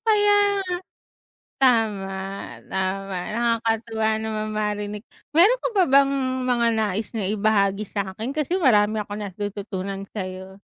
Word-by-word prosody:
Kaya 415 Hz, -2 st, +4 dB, 0.3 s
nga. 375 Hz, -2 st, -2 dB, 0.9 s
Tama, 220 Hz, -6 st, +3 dB, 0.6 s
tama. 190 Hz, 0 st, -2 dB, 0.2 s
Nakakatuwa 225 Hz, -1 st, 0 dB
namang 215 Hz, -1 st, -3 dB
marinig. 210 Hz, 0 st, -3 dB, 0.3 s
Meron 385 Hz, +11 st, +5 dB
ka -, -, +1 dB
pa 390 Hz, -4 st, +4 dB
bang 275 Hz, 0 st, +5 dB, 0.3 s
mga 245 Hz, -2 st, +2 dB
nais 215 Hz, -1 st, -1 dB
na 220 Hz, -, -1 dB
ibahagi 200 Hz, 0 st, +1 dB
sa'kin? 205 Hz, +7 st, -4 dB
Kasi 310 Hz, +5 st, 0 dB
marami 215 Hz, -, +4 dB
akong 210 Hz, 0 st, -5 dB
natututunan 195 Hz, 0 st, -5 dB
sa'yo. 190 Hz, -1 st, -6 dB
215 Hz, 115 wpm, -24 LUFS, 200-235 Hz, 0.9 s, Meron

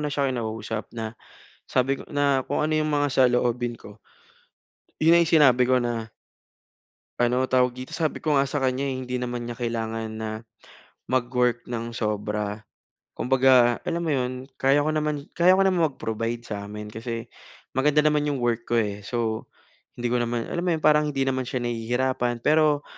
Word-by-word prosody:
na 150 Hz, -, -1 dB
siya 140 Hz, -2 st, +1 dB
kinausap 110 Hz, -2 st, -4 dB
na 110 Hz, -1 st, -4 dB, 0.6 s
sabi 135 Hz, +2 st, +1 dB
ko -, -, -9 dB
na 140 Hz, -2 st, +2 dB
kung 145 Hz, -, -1 dB
ano 155 Hz, +1 st, 0 dB
yung 155 Hz, 0 st, 0 dB
mga 145 Hz, 0 st, +2 dB
saloobin 120 Hz, -2 st, +2 dB
ko 105 Hz, +1 st, -13 dB, 1.0 s
yun 160 Hz, +2 st, +5 dB
na 170 Hz, -, +7 dB
yung 170 Hz, -, +2 dB
sinabi 130 Hz, -4 st, +6 dB
ko 130 Hz, -, +4 dB
na 120 Hz, -2 st, -1 dB, 1.1 s
ano 125 Hz, +2 st, +2 dB
tawag 125 Hz, -1 st, +3 dB
dito 130 Hz, +1 st, -8 dB
sabi 160 Hz, -2 st, -1 dB
ko 150 Hz, -3 st, +1 dB
nga 135 Hz, -, +4 dB
sa 140 Hz, +1 st, -2 dB
kanya 130 Hz, +1 st, 0 dB
eh 135 Hz, -, -1 dB
hindi 125 Hz, 0 st, -3 dB
naman 120 Hz, -1 st, -4 dB
niya 120 Hz, -, -5 dB
kailangan 115 Hz, -2 st, -3 dB
na 110 Hz, -, -3 dB, 0.8 s
mag-work 125 Hz, -1 st, +1 dB
ng 115 Hz, -1 st, -4 dB
sobra. 105 Hz, -1 st, -3 dB, 0.5 s
Kumbaga 125 Hz, -2 st, +4 dB
alam 170 Hz, 0 st, -3 dB
mo 155 Hz, -, 0 dB
iyon 130 Hz, -1 st, -2 dB, 0.2 s
kaya 140 Hz, +2 st, +4 dB
ko 155 Hz, -, 0 dB
naman 150 Hz, -2 st, -1 dB
kaya 180 Hz, +2 st, +5 dB
ko 195 Hz, -, +4 dB
naman 180 Hz, -4 st, +3 dB
mag-provide 115 Hz, -2 st, -4 dB
sa 100 Hz, -2 st, -6 dB
amin 105 Hz, 0 st, -8 dB
kasi 115 Hz, 0 st, -5 dB, 0.5 s
maganda 150 Hz, +3 st, +3 dB
naman 150 Hz, -1 st, +2 dB
iyong 145 Hz, -, 0 dB
work 115 Hz, -1 st, -1 dB
ko 120 Hz, -, +1 dB
eh, 105 Hz, -3 st, 0 dB
so, 110 Hz, +1 st, -3 dB, 0.5 s
hindi 120 Hz, 0 st, -2 dB
ko 125 Hz, -, +2 dB
naman, 120 Hz, -1 st, -1 dB
alam 175 Hz, -, -1 dB
mo 180 Hz, -, 0 dB
iyon 155 Hz, -, -9 dB
parang 150 Hz, 0 st, +5 dB
hindi 135 Hz, -2 st, 0 dB
naman 130 Hz, -2 st, -1 dB
siya 125 Hz, -2 st, -2 dB
nahihirapan 120 Hz, +1 st, -1 dB
pero, 150 Hz, -1 st, +3 dB
125 Hz, 180 wpm, -25 LUFS, 115-145 Hz, 1.1 s, na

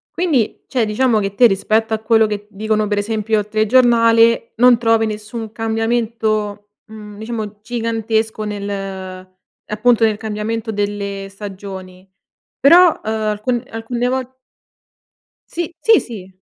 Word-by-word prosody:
Quindi 300 Hz, -, 0 dB
cioè 245 Hz, -4 st, 0 dB
diciamo 225 Hz, +2 st, +1 dB
che 195 Hz, -1 st, -3 dB
te 240 Hz, +4 st, +6 dB
rispetto 220 Hz, +2 st, 0 dB
a -, -, -3 dB
quello 220 Hz, 0 st, +3 dB
che 210 Hz, -1 st, -4 dB
dicono 215 Hz, +1 st, -1 dB
per 205 Hz, 0 st, 0 dB
esempio 215 Hz, +1 st, 0 dB
al 205 Hz, -, -4 dB
telegiornale, 230 Hz, +1 st, +3 dB
non 245 Hz, +1 st, +6 dB
trovi 225 Hz, -1 st, +2 dB
nessun 215 Hz, +1 st, -6 dB
cambiamento, 220 Hz, -2 st, -2 dB
mhmm, 210 Hz, -1 st, -11 dB
diciamo 215 Hz, -2 st, -6 dB
gigantesco 225 Hz, -1 st, -2 dB
nel 205 Hz, -1 st, -4 dB
ehm, 190 Hz, -2 st, -6 dB, 0.4 s
appunto 225 Hz, +2 st, +2 dB
nel 215 Hz, -2 st, +2 dB
cambiamento 220 Hz, +1 st, -4 dB
delle 200 Hz, -1 st, -3 dB
stagioni. 190 Hz, -2 st, -9 dB, 0.5 s
Però, 345 Hz, +4 st, +6 dB
ehm, 220 Hz, -, -2 dB, 0.2 s
alcu 235 Hz, +4 st, -1 dB
alcune 235 Hz, +2 st, -3 dB
vol 260 Hz, 0 st, -3 dB, 1.2 s
Sì. 340 Hz, -1 st, -4 dB
Sì 445 Hz, +6 st, +5 dB
sì. 190 Hz, -5 st, -10 dB
220 Hz, 130 wpm, -18 LUFS, 205-230 Hz, 1.2 s, te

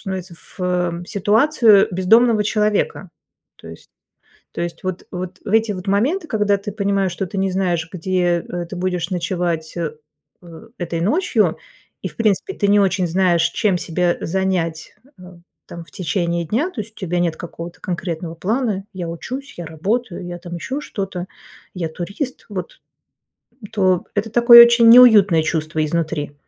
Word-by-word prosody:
становится, 190 Hz, -2 st, -6 dB, 0.2 s
в 180 Hz, -1 st, -1 dB
ситуацию 215 Hz, +1 st, +4 dB
бездомного 220 Hz, +5 st, +4 dB
человека. 210 Hz, -3 st, -1 dB, 0.5 s
То -, -, -13 dB
есть, 80 Hz, -, -13 dB, 0.6 s
то -, -, -6 dB
есть 170 Hz, 0 st, -5 dB
вот, 185 Hz, -1 st, -4 dB
вот 180 Hz, +1 st, -6 dB
в -, -, -7 dB
эти 220 Hz, 0 st, +2 dB
вот 185 Hz, 0 st, -7 dB
моменты, 285 Hz, -, 0 dB
когда 210 Hz, -3 st, +1 dB
ты 200 Hz, +1 st, -6 dB
понимаешь, 200 Hz, -2 st, 0 dB
что 190 Hz, -, -4 dB
ты 195 Hz, +2 st, -6 dB
не 190 Hz, 0 st, 0 dB
знаешь, 175 Hz, -3 st, -1 dB
где, 175 Hz, -1 st, 0 dB
э, 175 Hz, -1 st, -4 dB
ты 185 Hz, -, -8 dB
будешь 180 Hz, 0 st, -2 dB
ночевать, 170 Hz, -3 st, -2 dB
э, 165 Hz, -3 st, -3 dB, 0.5 s
э 170 Hz, +1 st, -13 dB
этой 170 Hz, -1 st, -3 dB
ночью, 305 Hz, -, +1 dB, 0.4 s
и, -, -, -3 dB
в -, -, -17 dB
принципе, 220 Hz, -, 0 dB
ты 200 Hz, -, 0 dB
не 205 Hz, +1 st, +5 dB
очень 190 Hz, -2 st, +1 dB
знаешь, 175 Hz, -1 st, +2 dB
чем 195 Hz, -4 st, 0 dB
себя 175 Hz, +1 st, 0 dB
занять, 175 Hz, -3 st, -2 dB, 0.2 s
э, -, -, -14 dB, 0.4 s
там 170 Hz, -1 st, -9 dB
в -, -, -22 dB
течение 170 Hz, 0 st, -2 dB
дня. 240 Hz, -, -1 dB
То 260 Hz, -, -6 dB
есть, 215 Hz, +2 st, -15 dB
у -, -, -44 dB
тебя 180 Hz, -3 st, -3 dB
нет 170 Hz, -2 st, 0 dB
какого-то 170 Hz, 0 st, -9 dB
конкретного 170 Hz, -2 st, -4 dB
плана: 210 Hz, +1 st, -1 dB
я 180 Hz, -3 st, -5 dB
учусь, 255 Hz, -, -7 dB
я 175 Hz, -, -7 dB
работаю, 185 Hz, +5 st, -3 dB
я 175 Hz, 0 st, -6 dB
там 175 Hz, 0 st, -9 dB
ещё 260 Hz, -, -4 dB
что-то, 190 Hz, -8 st, -5 dB, 0.5 s
я 170 Hz, -3 st, -3 dB
турист. 200 Hz, -, -6 dB
Вот, 185 Hz, -4 st, -7 dB, 0.9 s
то 185 Hz, -4 st, +1 dB
это 205 Hz, +2 st, -1 dB
такое 235 Hz, +1 st, +9 dB
очень 235 Hz, -1 st, +5 dB
неуютное 210 Hz, -9 st, +7 dB
чувство 155 Hz, -1 st, -1 dB
изнутри. 155 Hz, -2 st, -2 dB
185 Hz, 165 wpm, -19 LUFS, 170-210 Hz, 0.9 s, такое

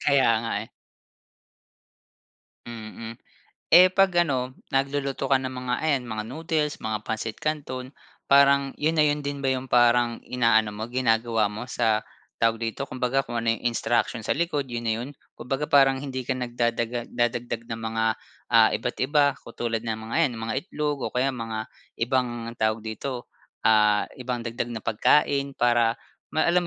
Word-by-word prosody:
Kaya 140 Hz, -4 st, +3 dB
nga 115 Hz, -, -3 dB
eh. -, -, -18 dB, 2.0 s
Mhm, 115 Hz, 0 st, -8 dB, 0.6 s
eh, 180 Hz, +3 st, +8 dB
'pag 195 Hz, 0 st, +5 dB, 0.2 s
ano, 130 Hz, -3 st, -2 dB, 0.2 s
nagluluto 135 Hz, 0 st, -1 dB
ka 135 Hz, -, +5 dB
ng 130 Hz, 0 st, -5 dB
mga 125 Hz, -1 st, -3 dB
ayan, 140 Hz, -5 st, +1 dB
mga 110 Hz, -1 st, -3 dB
noodles, 150 Hz, +3 st, -2 dB
mga 110 Hz, -1 st, -3 dB
pansit 110 Hz, 0 st, -3 dB
canton, 140 Hz, -4 st, -4 dB, 0.3 s
parang 140 Hz, 0 st, +5 dB
yon 160 Hz, +2 st, +1 dB
na 155 Hz, -, +5 dB
yon 150 Hz, 0 st, +1 dB
din 140 Hz, -1 st, -4 dB
ba 135 Hz, -, +2 dB
yong, 130 Hz, 0 st, -5 dB
parang 120 Hz, -1 st, +4 dB
ina-ano 115 Hz, -3 st, +2 dB
mo, 110 Hz, +2 st, -5 dB
ginagawa 115 Hz, -3 st, +1 dB
mo 110 Hz, +4 st, -6 dB
sa, 110 Hz, -3 st, +1 dB, 0.4 s
tawag 115 Hz, -1 st, +3 dB
dito? 115 Hz, +4 st, -3 dB
Kumbaga 130 Hz, +1 st, 0 dB
kung 120 Hz, -3 st, -5 dB
ano 115 Hz, 0 st, +1 dB
yong -, -, -14 dB
instruction 120 Hz, 0 st, 0 dB
sa -, -, +2 dB
likod 150 Hz, -5 st, -1 dB
yon 120 Hz, -1 st, -4 dB
na 110 Hz, -, +2 dB
'yon? 125 Hz, -, -5 dB, 0.3 s
Kumbaga 135 Hz, +4 st, -3 dB
parang, 135 Hz, -3 st, +5 dB
hindi 130 Hz, -2 st, -4 dB
ka 130 Hz, -, +1 dB
nagdadaga 120 Hz, -1 st, -2 dB
nagdadagdag 120 Hz, -1 st, -1 dB
ng 115 Hz, -, -4 dB
mga, 110 Hz, 0 st, -1 dB, 0.5 s
ah, -, -, +7 dB
iba't-iba, 145 Hz, +2 st, +1 dB
katulad 115 Hz, -1 st, -4 dB
ng 110 Hz, -1 st, -1 dB
mga -, -, -3 dB
yan, 125 Hz, -, -7 dB
mga 115 Hz, -, -2 dB
itlog, 150 Hz, -5 st, -2 dB
o -, -, -9 dB
kaya 125 Hz, +2 st, +2 dB
mga 115 Hz, -3 st, -5 dB, 0.3 s
ibang, 120 Hz, -2 st, -1 dB
tawag 110 Hz, 0 st, +1 dB
dito? 120 Hz, +3 st, -5 dB, 0.3 s
Ah, 105 Hz, -2 st, +4 dB, 0.2 s
ibang 125 Hz, -1 st, -3 dB
dagdag 115 Hz, +1 st, -3 dB
na 110 Hz, -, -6 dB
pagkain. 140 Hz, +4 st, +2 dB
Para 120 Hz, -1 st, +3 dB, 0.4 s
alam 170 Hz, +3 st, +3 dB
125 Hz, 160 wpm, -25 LUFS, 115-140 Hz, 2.0 s, eh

